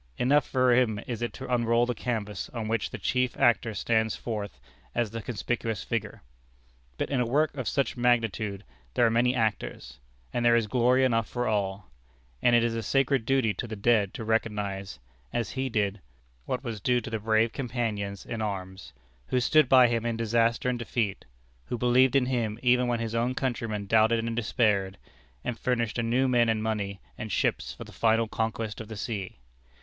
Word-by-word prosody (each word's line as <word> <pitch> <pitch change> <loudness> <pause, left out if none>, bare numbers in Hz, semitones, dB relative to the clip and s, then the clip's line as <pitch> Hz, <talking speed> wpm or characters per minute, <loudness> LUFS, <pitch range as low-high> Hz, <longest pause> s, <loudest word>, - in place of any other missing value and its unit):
Enough 140 +3 +3
for 130 -1 +3
him 120 -4 +2
is 120 -3 -5
it 120 - -1
to 130 -1 -5
unroll 115 0 +3
the 125 - -1
canvas 105 -5 -3
on 110 -2 -3
which 110 -1 -1
the - - -6
chief 125 -1 0
actor 120 -4 +3
stands 110 +2 +1
forth 105 -4 -5 0.4
as 115 -3 0
the 115 0 -5
conspicuous 115 -1 -3
figure. - - -4 0.7
But - - -2
in 135 - +1
a - - +1
work 145 +4 +1
of 130 -4 -4
such 140 -1 0
magnitude 115 -5 0 0.3
there 120 - +4
are 115 - +3
many 125 +2 +2
actors, 100 - -2 0.3
and 120 - 0
there 120 0 +5
is 115 -2 +2
glory 125 +3 +3
enough 115 -4 +1
for 120 0 -2
all; 100 -2 -2 0.5
and 120 - +4
it 120 - +4
is 115 -1 0
a 115 - -2
sacred 135 +1 +1
duty 130 -5 +2
to 110 +6 -5
the 110 - -5
dead 105 -2 +2
to - - -5
recognize, 105 -3 -2 0.3
as 115 -3 -2
he 130 0 -2
did, 105 -3 -1 0.4
what 130 - -3
was 115 -5 -5
due 125 +3 +2
to 115 -1 -8
the 110 - -1
brave 110 +1 +2
companions 110 -6 -3
in 115 -1 -4
arms, 95 -3 -5 0.3
who 125 - +1
stood 150 +2 +4
by 130 -2 +7
him 115 -1 0
in 115 -1 -1
disaster 115 +1 +1
and 125 -1 0
defeat; 115 -3 -2 0.4
who 120 - -3
believed 125 +2 +4
in 135 -2 +4
him 115 -4 -1
even 125 0 +4
when 120 -1 0
his 115 -1 -3
own 120 +2 0
countrymen 115 -6 -2
doubted 110 +2 +4
and 115 0 -2
despaired; 105 -4 +1 0.5
and 125 -2 -4
furnished 120 -2 0
anew 120 +3 +2
men 120 -2 +3
and 110 -1 0
money 100 -3 -2 0.2
and 110 -3 -5
ships - - 0
for - - -8
the - - -13
final 115 0 +2
conquest 110 0 -3
of 110 - -9
the 110 -1 -8
sea. 100 - -4
115 Hz, 195 wpm, -28 LUFS, 110-125 Hz, 0.7 s, by